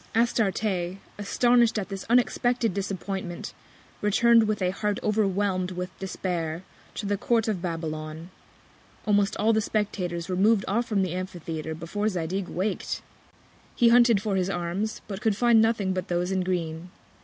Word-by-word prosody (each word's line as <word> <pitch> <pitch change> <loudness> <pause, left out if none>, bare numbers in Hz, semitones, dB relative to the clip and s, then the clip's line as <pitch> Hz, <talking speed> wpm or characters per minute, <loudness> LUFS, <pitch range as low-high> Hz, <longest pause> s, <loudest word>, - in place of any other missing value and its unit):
Astarte, 200 -5 +1 0.2
astonish'd 240 +2 +3
at 200 -2 -3
this 195 -1 -6
unexpected 245 -2 +2
Disappointment, 190 -2 -4 0.5
return'd 225 +2 +5
with 215 -1 0
a 180 -1 +1
Heart 205 +1 -1
overwhelm'd 200 -3 +1
with 180 +1 -4
Despair, 175 -3 -3 0.3
to 210 - -4
the 200 0 0
Court 225 +2 +1
of 205 -5 -1
Babylon. 160 -1 -5 0.7
Almost 205 -1 +2
all 220 +2 +3
the 220 - +2
Spectators 185 -6 -2
were 185 - -2
mov'd 205 +2 +3
off 235 +4 0
from 200 -3 +1
the 180 -2 -2
Amphitheatre 165 -4 -5
before 205 +6 -2
Zadig 180 0 -2
wak'd: 190 +4 -2 0.7
He 235 - +5
hunted 235 -4 +5
for 210 -3 0
his 185 0 +1
Arms; 185 +4 -2
but 195 -1 -6
could 215 -3 +1
find 235 -1 +5
nothing 220 -4 +1
but 185 -1 -3
those 175 +1 -1
in 190 -1 +1
green. 175 -2 -3
195 Hz, 155 wpm, -26 LUFS, 180-215 Hz, 0.7 s, return'd